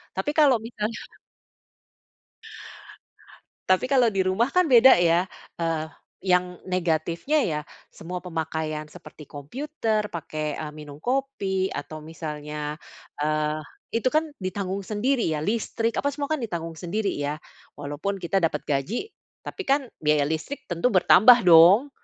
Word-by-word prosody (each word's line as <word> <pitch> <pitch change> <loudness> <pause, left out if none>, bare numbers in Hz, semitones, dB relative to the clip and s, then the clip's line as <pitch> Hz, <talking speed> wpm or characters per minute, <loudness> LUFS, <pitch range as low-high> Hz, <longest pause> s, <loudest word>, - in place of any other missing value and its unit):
Tapi 195 +10 -1
kalau 285 -6 +5
misalnya 220 0 -5 2.6
Tapi 185 +5 +3
kalau 255 -3 +3
di 195 -3 0
rumah 200 +7 +1
kan 360 +5 +3
beda 260 -2 +7
ya, 175 +1 +2 0.3
eee, 165 -2 -1 0.4
yang 180 -1 +1
negatifnya, 175 - 0
ya, 150 -3 -1 0.3
semua 180 +2 -7
pemakaian 160 -2 -4
seperti 155 -3 -13
computer, 215 - -3
pakai, 155 -3 -4
eee, 155 -1 -6
minum 150 -2 -10
kopi, 200 - -1
atau 155 +2 -6
misalnya, 150 -1 -6 0.4
eee, 155 0 0 0.3
itu 230 +3 +1
kan 310 +4 +2 0.2
ditanggung 190 +1 -3
sendiri 225 +5 0
ya, 150 - -3
listrik, 230 +2 -1
apa, 285 - 0
semua 285 +2 -3
kan 305 - -1
ditanggung 165 -7 -5
sendiri, 195 +3 -2
ya. 145 +1 -3 0.4
Walaupun 145 +7 -4
kita 190 +1 -1
dapat 160 -3 -1
gaji, 175 - -2 0.3
tapi 390 - -6
kan 275 0 +3 0.2
biaya 150 -1 +2
listrik 160 - -4
tentu 175 +7 0
bertambah, 230 +3 +6
dong. 180 - +7
185 Hz, 130 wpm, -25 LUFS, 155-235 Hz, 2.6 s, beda